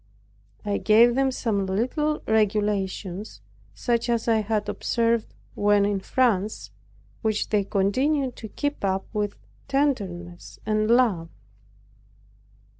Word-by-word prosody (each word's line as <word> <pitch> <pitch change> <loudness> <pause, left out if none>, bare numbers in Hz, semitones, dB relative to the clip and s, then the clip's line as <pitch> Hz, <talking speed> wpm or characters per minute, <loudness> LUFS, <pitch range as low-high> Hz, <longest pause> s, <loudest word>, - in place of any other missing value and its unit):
I 205 -1 0
gave 230 +3 +5
them 270 +1 +2
some 215 -6 -1
little 260 +10 -1
regulations 205 - -1 0.4
such 235 - 0
as 235 -1 0
I 225 -1 +4
had 215 0 -1
observed 230 -1 0 0.2
when 205 0 +3
in 205 -1 0
France, 205 - 0 0.5
which 215 -1 -1
they 210 -2 +2
continued 255 +8 0
to 220 - -7
keep 290 +1 -3
up 190 -1 0
with 205 -1 -1 0.3
tenderness 200 -12 -2
and 215 0 +1
love. 225 -9 +3
215 Hz, 115 wpm, -25 LUFS, 200-240 Hz, 0.5 s, gave